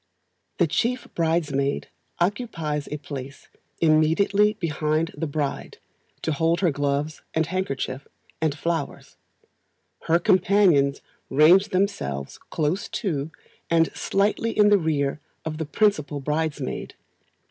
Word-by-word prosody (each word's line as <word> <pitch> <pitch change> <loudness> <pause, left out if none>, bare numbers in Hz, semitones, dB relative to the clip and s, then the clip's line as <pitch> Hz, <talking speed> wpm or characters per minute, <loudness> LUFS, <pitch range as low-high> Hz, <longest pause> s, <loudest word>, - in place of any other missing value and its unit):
The - - +4
Chief 250 +2 -1
Bridesmaid 155 -4 0 0.3
occupies 170 - -1
a 150 - -2
place 140 -2 -8 0.3
immediately 165 +7 +3
behind 160 -4 -1
the 165 - -3
bride, 145 -1 -3 0.5
to 160 - 0
hold 165 +4 +1
her 175 -4 +3
gloves 145 +2 -1
and 160 0 +2
handkerchief, 140 -7 -3 0.3
and 155 -2 0
flowers; 170 +1 -3 0.9
her 165 - +5
companions 180 -6 +3 0.3
range 165 +8 +6
themselves 185 - -2
close 160 +6 -1
to, 155 - -2 0.4
and 165 -1 +2
slightly 210 +3 0
in 210 -1 +6
the 205 -1 +5
rear 150 -3 0 0.3
of 155 0 -4
the 160 - -2
principal 150 -5 +1
bridesmaid. 150 -1 -3
160 Hz, 115 wpm, -24 LUFS, 145-185 Hz, 0.9 s, range